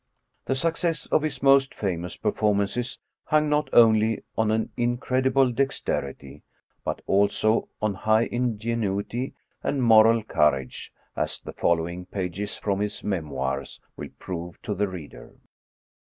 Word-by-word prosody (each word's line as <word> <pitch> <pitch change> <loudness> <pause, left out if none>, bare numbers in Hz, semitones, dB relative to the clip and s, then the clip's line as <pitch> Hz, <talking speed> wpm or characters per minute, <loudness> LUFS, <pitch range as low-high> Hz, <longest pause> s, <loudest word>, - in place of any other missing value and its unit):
The 135 - 0
success 165 +2 0
of - - +2
his 140 -4 -4
moat 135 0 +5
famous 90 -3 -3
performances 105 +3 0 0.3
hung 155 0 +2
not 150 0 +1
only 110 -1 +5
on 110 -1 +1
an 110 0 0
incredible 130 +2 +1
dex« 135 +3 0
terity, 70 -1 -4 0.4
but - - -4
also 100 +3 +2
on 110 -1 +1
high 110 +3 +2
ingenuity 115 0 -2 0.3
and 140 -3 -1
moral 115 0 +6
courage, 75 -9 0 0.2
as - - -2
the - - -9
following 85 +1 -1
pages 95 +2 -4
from 100 -2 -1
his 105 0 -3
•* - - -23
Memoirs 70 -8 -3
" - - -46
will - - -7
prove 85 -2 -6
to 105 - -2
the 100 +1 0
reader. 90 -6 -10
110 Hz, 140 wpm, -25 LUFS, 95-125 Hz, 0.4 s, moral